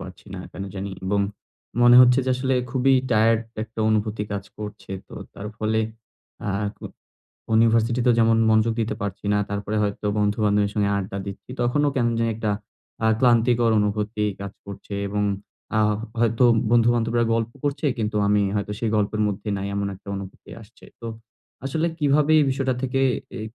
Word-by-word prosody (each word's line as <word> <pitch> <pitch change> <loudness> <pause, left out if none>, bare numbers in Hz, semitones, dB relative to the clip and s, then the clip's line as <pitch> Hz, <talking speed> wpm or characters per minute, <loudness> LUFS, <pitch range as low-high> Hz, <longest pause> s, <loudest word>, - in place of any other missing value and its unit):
পারছি - - -11
না - - -6
কেন 95 - -6
জানি 100 +1 -4
এবং 100 +1 +1 0.6
মনে 120 0 +8
হচ্ছে 125 +1 +6
যে 130 - 0
আসলে 130 +1 0 0.2
খুবই 135 +1 +2 0.2
টায়ার্ড 110 0 +4 0.2
একটা 110 0 -7
অনুভূতি 110 0 0
কাজ 100 -1 -3
করছে। 105 -1 -8 0.2
তো - - -11 0.2
তার 100 - -7
ফলে 110 0 0 0.7
আ - - -1 0.3
ক - - -32 0.7
ইউনিভার্সিটি 115 +2 +3
তে - - +6
যেমন 115 0 +4
মনোযোগ 110 +1 +3
দিতে 110 -1 -1
পারছি 100 0 -5
না। 105 - +3
তারপরে 100 +1 -3
হয়তো 105 0 -2
বন্ধু 105 +1 +1
বান্ধবীর 105 -1 +2
সঙ্গে 100 -1 +1
আড্ডা 100 0 -4
দিচ্ছি। 100 +5 -8
তখনও 145 +5 +2
কেমন 120 -3 +1
জানি 115 0 +1
একটা 110 -1 -1 0.5
আ - - +4
ক্লান্তিকর 120 -1 +4
অনুভূতি 105 +1 -1 0.2
কাজ 100 0 -6
করছে 100 0 -8
এবং 105 +1 -1 0.5
আ - - +3 0.4
হয়তো 115 +2 +3 0.3
বন্ধু-বান্ধবীরা 120 0 +3
গল্প 115 0 -1
করছে 145 +2 -1
কিন্তু 105 -1 -1
আমি 105 0 +3
হয়তো 105 0 -2
সেই 115 -2 0
গল্পের 105 +1 0
মধ্যে 100 +1 -5
নাই 95 - -3
এমন 100 0 -1
একটা 95 - -15
অনুভূতি 95 -1 -9
আসছে। 110 +3 -18 0.2
তো 115 - -6 0.6
আসলে 160 +5 0
কিভাবে 150 +1 +3
এই - - +4
বিষয়টা 130 -1 0
থেকে 135 +1 0 0.4
এ - - -5
110 Hz, 170 wpm, -23 LUFS, 105-120 Hz, 0.7 s, মনে